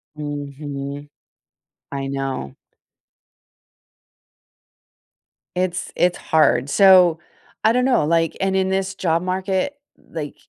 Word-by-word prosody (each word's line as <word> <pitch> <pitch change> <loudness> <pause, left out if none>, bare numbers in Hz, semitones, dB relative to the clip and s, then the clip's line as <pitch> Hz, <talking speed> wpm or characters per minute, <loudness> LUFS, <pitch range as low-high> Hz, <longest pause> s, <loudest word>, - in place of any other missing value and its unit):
Mhm. 145 -1 -6 0.8
I 135 -1 -3
know. 135 - -4 3.0
It's 180 0 -2
it's 180 0 +2
hard. 140 -4 +2
So 185 -3 +6 0.4
I 220 - +5
don't 250 +1 +2
know, 250 - +3
like, 165 0 +1
and 190 0 +1
in 190 0 +1
this 190 0 -1
job 165 -3 0
market, 190 +7 -1 0.3
like, 150 -3 -6
165 Hz, 95 wpm, -21 LUFS, 145-190 Hz, 3.0 s, So